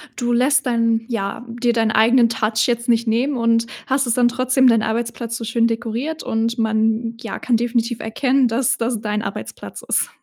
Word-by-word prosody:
du 240 -1 -2
lässt 270 +4 +2
dann, 230 -2 +1
ja, 215 +1 -3
dir 240 0 0
deinen 225 -1 +1
eigenen 230 +2 +4
Touch 220 -1 0
jetzt 235 0 -1
nicht 235 -1 +2
nehmen 250 +6 +1
und 230 0 +2 0.2
hast 265 -1 0
es 230 - +2
dann 240 -1 +3
trotzdem 255 +1 +2
deinen 225 -2 +4
Arbeitsplatz 230 +1 -3
so 230 - -7
schön 230 +1 +1
dekoriert 240 +7 -3
und 230 +2 -1
man, 225 +1 0
ja, - - -6
kann 240 -3 +1
definitiv 235 0 -1
erkennen, 255 +3 +1
dass 235 +2 0
das 230 -2 -2
dein 210 0 -2
Arbeitsplatz - - -7
ist. - - 0
235 Hz, 190 wpm, -20 LUFS, 225-245 Hz, 0.2 s, eigenen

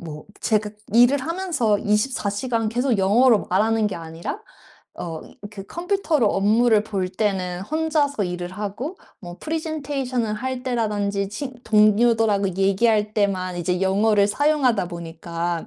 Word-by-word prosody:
뭐 150 -3 -8 0.2
제가 215 -1 0 0.2
일을 245 +4 +6
하면서 320 - 0
24 210 +2 0
시간 225 +1 -1
계속 240 0 0
영어로 220 +4 +4
말하는 215 +3 +2
게 205 - -3
아니라 165 - -6 0.6
어 165 -2 -5 0.3
그 200 -2 -9
컴퓨터로 345 - 0
업무를 215 +3 +3
볼 195 -4 -2
때는 185 -2 -2
혼자서 300 -2 0
일을 180 0 -4
하고 210 - -5 0.2
뭐 175 -2 -9
프레젠테이션을 280 -8 -2
할 255 +3 -4
때라든지 205 -5 -1
친 260 +5 -6
동료들하고 215 -1 +3
얘기할 210 +2 +2
때만 185 -3 0
이제 180 +1 -1
영어를 200 +2 +3
사용하다 260 - +1
보니까 170 0 -4
210 Hz, 295 characters per minute, -22 LUFS, 195-255 Hz, 0.6 s, 일을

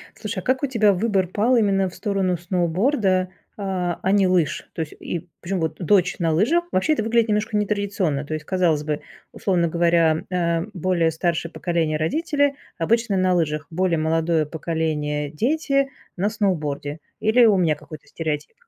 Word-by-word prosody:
Слушай, 215 -1 -5
а - - -12
как 260 +5 0
у - - +2
тебя 225 -6 +3
выбор 195 -1 +1
пал 215 +8 +2
именно 195 -4 +2
в 180 - -11
сторону 195 -4 0
сноуборда, 185 - +1 0.3
а 185 -4 -2
а 190 - +1
не 200 -1 +4
лыж? 175 -5 0
То - - -5
есть 155 - -7
и 175 0 -5
Причём 185 +1 -2
вот 160 -1 -2
дочь 190 +1 +2
на 165 -2 +1
лыжах. 260 - +2
Вообще 190 +12 +2
это 255 - -1
выглядит 230 +1 +2
немножко 210 +1 0
нетрадиционно, 200 -8 -1
то 155 - -4
есть 155 -1 -5
казалось 175 -5 +1
бы, 150 -1 -2 0.3
условно 185 -6 +1
говоря, 170 -1 +2
э, 170 -2 0
более 180 -3 +1
старшее 165 0 -1
поколение- 165 -3 -1
родители- 285 - +1 0.2
обычно 220 +4 +1
на 185 -1 +2
лыжах, 155 -3 -1
более 175 0 +1
молодое 160 0 +1
поколение- 150 -2 -2
дети- 275 - +1 0.3
на 195 +3 +1
сноуборде. 155 -8 -2 0.2
Или 230 +3 +5
у 210 -3 +5
меня 170 -4 +2
какой-то 150 0 -12
стереотип? 155 - -4
180 Hz, 170 wpm, -22 LUFS, 160-210 Hz, 0.3 s, Или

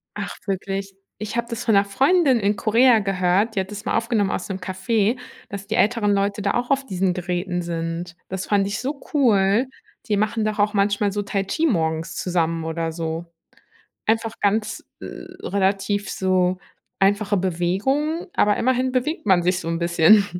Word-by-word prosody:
Ach, - - -5
wirklich? 195 0 -3 0.3
Ich 215 +1 -5
habe 235 0 -1
das 230 0 -4
von 225 - +3
'ner 200 0 +5
Freundin 270 - +3
in 205 0 +1
Korea 230 +3 +4
gehört. 195 +2 +1
Die - - +1
hat 190 +1 -3
das 210 +1 -7
mal - - +1
aufgenommen 225 -4 +1
aus 180 - -3
'nem 190 -1 -3
Café, 200 +5 0 0.3
dass 200 0 -7
die 220 - -1
älteren 210 -1 +2
Leute 200 +1 0
da 200 - 0
auch 245 0 -1
auf 275 0 +1
diesen 190 -4 0
Geräten 180 0 -2
sind. 165 0 -4
Das 185 0 -4
fand 200 -1 +2
ich 200 - -3
so 275 +2 -4
cool. 225 -4 +3 0.4
Die 210 - +2
machen 215 +1 0
doch 215 0 -2
auch 210 +1 +2
manchmal 200 0 +1
so 205 +1 -2
Tai 200 -1 -1
Chi 315 +11 -1
morgens 160 - 0
zusammen, 165 -2 -1
oder 165 0 -2
so 165 0 -4 0.8
einfach 225 0 +1
ganz, 210 +1 0 0.2
äh, - - -8 0.4
relativ 200 +1 0
so 185 -1 +1 0.4
einfache 205 +1 +2
Bewegung. 195 - 0
Aber 205 0 +3
immerhin 255 +1 +1
bewegt 260 +4 -1
man 185 -4 +4
sich 180 +1 +1
so 165 - -7
'n 165 0 -1
bisschen. 170 +4 +5
200 Hz, 180 wpm, -22 LUFS, 185-225 Hz, 0.8 s, ner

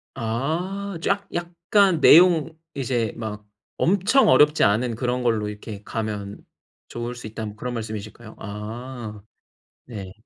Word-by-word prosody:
아. 170 - -2
쫙 200 +2 0
약간 175 +1 +2
내용 165 -2 +6 0.2
이제 120 -5 -1
막 105 -2 -6 0.3
"엄청 200 +9 +3
어렵지 150 +4 +5
않은 115 +3 +2
그런 125 +1 -1
걸로 110 -3 +1
이렇게 105 0 -8
가면 105 -3 -4 0.5
좋을 120 +1 -5
수 120 -2 -8
있다."는 110 0 -5
뭐 - - -15
그런 125 +3 -4
말씀이실까요? 110 0 -7
아 110 +1 -7 0.6
네. 100 -6 -8
120 Hz, 245 characters per minute, -23 LUFS, 110-165 Hz, 0.6 s, 내용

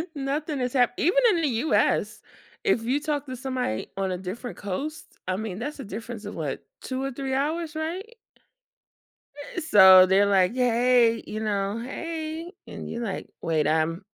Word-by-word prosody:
Nothing 285 +1 -2
has 250 -1 -2
happ 245 -2 +3
even 360 +9 +2
in 340 - +1
the 315 - +2 0.2
US, - - +2 0.4
if 385 - +2
you 260 +5 +1
talk 295 -1 -2
to 255 -2 -6
somebody 255 - -3
on 195 -1 -1
a 180 - -2
different 195 +7 -6
coast, 275 +11 -5
I 185 - 0
mean, 210 -2 -5
that's 290 +5 -5
a - - -5
difference 225 +2 -7
of 205 - -6
what, 150 -4 -4 0.2
2 260 0 -4
or 275 - -2
3 270 +1 -4
hours, 310 +4 -1
right? 370 +9 -5 1.4
Eh, 360 - -2
so 190 - +8
they're 190 +2 +4
like, 195 +1 +3
"Hey," 245 -1 +3
you 215 - -4
know, 205 0 -1
"hey," 325 +4 -5 0.2
and - - -8
you're 235 - -4
like, 195 -4 -4
"Wait, 155 -3 +1
I'm-" 160 +4 0
245 Hz, 175 wpm, -26 LUFS, 200-295 Hz, 1.4 s, so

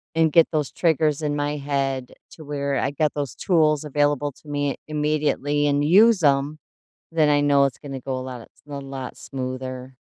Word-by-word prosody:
and 160 -1 +3
get 165 +1 +6
those 150 -4 -1
triggers 155 -3 +1
in 145 -1 0
my 145 0 -1
head 135 -2 -2 0.2
to 160 - -12
where 140 -1 -2
I 135 - 0
get 150 +1 0
those 145 -3 -3
tools 155 -5 +2
available 145 0 0
to - - -18
me 145 -1 -1
immediately 150 -1 0
and 145 0 +1
use 205 +6 +6
'em, 145 +1 +2 0.5
then 155 -2 +3
I 145 0 +4
know 140 -1 +4
it's 135 - -5
gonna 135 -2 -7
go 130 +1 -4
a - - -5
lot 130 -1 -7
a - - -13
s - - -25
a 145 -1 -5
lot 135 -1 -7
smoother. 130 -1 -6
145 Hz, 195 wpm, -23 LUFS, 135-150 Hz, 0.5 s, get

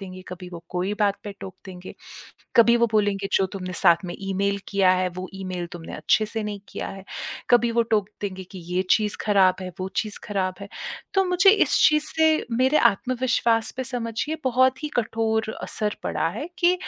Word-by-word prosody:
देंगे, 185 -1 -9
कभी 180 0 -8
वो 170 -1 -10
कोई 185 +2 -2
बात 200 -1 +3
पे 205 - -5
टोक 190 -2 -8
देंगे। 185 -1 -9 0.6
कभी 235 0 +7
वो 235 0 +3
बोलेंगे 205 -2 +1
जो 195 - +3
तुमने 185 -2 -5
साथ 170 +1 +4
में 175 - -5
ईमेल 195 +1 -1
किया 195 -2 +3
है 185 0 +1
वो 185 0 -5
ईमेल 185 -2 -4
तुमने 170 -2 -8
अच्छे 215 - +2
से 220 +1 -3
नहीं 205 -1 -5
किया - - -5
है। 195 -1 -9 0.5
कभी 240 -1 +5
वो 235 0 +3
टोक 215 -3 0
देंगे 190 -2 -5
कि 190 - -8 0.2
ये 185 - +2
चीज़ 210 -2 +3
ख़राब 195 -3 +4
है, 185 - -5
वो 185 - -2
चीज़ 215 -2 -1
ख़राब 190 -3 -1
है। 200 - -8 0.5
तो 385 -1 +4
मुझे 365 +2 +5
इस 415 - +4
चीज़ 305 0 +1
से 315 -1 +3
मेरे 260 +5 +3
आत्मविश्वास 235 0 0
पे 260 - -3
समझिए 245 +4 -3
बहुत 260 +2 +2
ही - - -1
कठोर 220 -1 0
असर 210 -1 -2
पड़ा - - -1
है 305 - -5
कि 355 0 +4
210 Hz, 195 wpm, -24 LUFS, 190-240 Hz, 0.6 s, कभी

